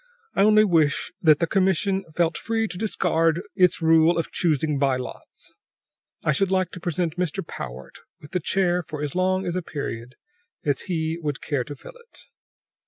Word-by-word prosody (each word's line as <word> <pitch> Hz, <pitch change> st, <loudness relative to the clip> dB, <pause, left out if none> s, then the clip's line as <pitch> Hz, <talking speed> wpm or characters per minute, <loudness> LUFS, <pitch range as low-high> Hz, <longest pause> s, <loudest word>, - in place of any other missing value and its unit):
I -, -, +1 dB
only 215 Hz, +1 st, +6 dB
wish 160 Hz, -8 st, +2 dB
that 155 Hz, -3 st, +6 dB
the 170 Hz, -, +1 dB
commission 190 Hz, +1 st, +1 dB
felt 170 Hz, -2 st, +1 dB
free 225 Hz, -1 st, -1 dB
to 180 Hz, -, -7 dB
discard 170 Hz, -5 st, +1 dB
its 180 Hz, -3 st, +3 dB
rule 160 Hz, +1 st, +5 dB
of 165 Hz, -, -2 dB
choosing 150 Hz, -3 st, +1 dB
by 135 Hz, -2 st, +2 dB
lots; 125 Hz, -, -9 dB, 0.7 s
I -, -, +2 dB
should 190 Hz, +6 st, +1 dB
like 185 Hz, -1 st, +1 dB
to -, -, -8 dB
present 170 Hz, 0 st, -2 dB
Mr. 180 Hz, +1 st, -2 dB
Powart 65 Hz, -, -8 dB, 0.2 s
with 150 Hz, -, -14 dB
the 180 Hz, -, 0 dB
chair 180 Hz, +1 st, +1 dB
for 150 Hz, -3 st, -6 dB
as 145 Hz, -, -3 dB
long 185 Hz, +1 st, +1 dB
a 180 Hz, +1 st, -1 dB
period 125 Hz, -6 st, -6 dB, 0.5 s
as 145 Hz, -2 st, +1 dB
he 160 Hz, -1 st, -1 dB
would 145 Hz, -2 st, -3 dB
care 140 Hz, -4 st, -2 dB
to 145 Hz, -, -7 dB
fill 135 Hz, -, -12 dB, 0.2 s
it." -, -, -13 dB
165 Hz, 175 wpm, -24 LUFS, 150-185 Hz, 0.7 s, only